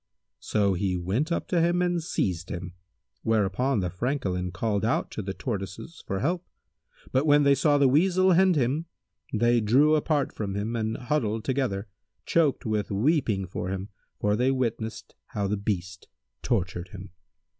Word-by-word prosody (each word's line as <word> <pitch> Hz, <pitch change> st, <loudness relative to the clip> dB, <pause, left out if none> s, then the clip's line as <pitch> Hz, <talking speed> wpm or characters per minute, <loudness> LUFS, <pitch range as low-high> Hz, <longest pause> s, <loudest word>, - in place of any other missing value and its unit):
So 100 Hz, -2 st, +1 dB
he 90 Hz, 0 st, -1 dB
went 105 Hz, -, -1 dB
up 170 Hz, -, -1 dB
to 175 Hz, -2 st, +2 dB
him 175 Hz, +1 st, +2 dB
and 175 Hz, -1 st, 0 dB
seized 90 Hz, -, -2 dB
him, 90 Hz, +1 st, -5 dB, 0.5 s
whereupon 110 Hz, +3 st, +1 dB
the 90 Hz, -1 st, -2 dB
Francolin 95 Hz, -5 st, -2 dB
called 100 Hz, +2 st, -1 dB
out 115 Hz, -, 0 dB
to -, -, -4 dB
the 95 Hz, -1 st, -5 dB
Tortoises 105 Hz, -, -5 dB
for 95 Hz, 0 st, -2 dB
help; 175 Hz, +5 st, 0 dB, 0.7 s
but 135 Hz, +4 st, +2 dB
when 145 Hz, 0 st, +6 dB
they 140 Hz, 0 st, +5 dB
saw 145 Hz, +2 st, +3 dB
the 140 Hz, -1 st, +5 dB
Weasel 185 Hz, +7 st, +4 dB
hend 185 Hz, 0 st, +5 dB
him, 145 Hz, +5 st, 0 dB, 0.4 s
they 120 Hz, +1 st, +3 dB
drew 135 Hz, +9 st, +4 dB
apart 150 Hz, -2 st, +1 dB
from 100 Hz, -3 st, -4 dB
him 105 Hz, +3 st, -2 dB
and 110 Hz, -1 st, -1 dB
huddled 115 Hz, -5 st, -1 dB
together, 125 Hz, -7 st, -1 dB, 0.4 s
choked 150 Hz, -5 st, +2 dB
with 105 Hz, -2 st, -1 dB
weeping 110 Hz, -, +1 dB
for 90 Hz, 0 st, -4 dB
him, 95 Hz, +1 st, -4 dB, 0.3 s
for 105 Hz, 0 st, +2 dB
they 125 Hz, +4 st, +2 dB
witnessed 115 Hz, -4 st, -2 dB
how 105 Hz, -5 st, -3 dB
the 100 Hz, +2 st, 0 dB
beast 90 Hz, -3 st, -4 dB, 0.3 s
tortured 95 Hz, -5 st, -1 dB
him. 95 Hz, 0 st, -10 dB
115 Hz, 165 wpm, -27 LUFS, 95-145 Hz, 0.7 s, when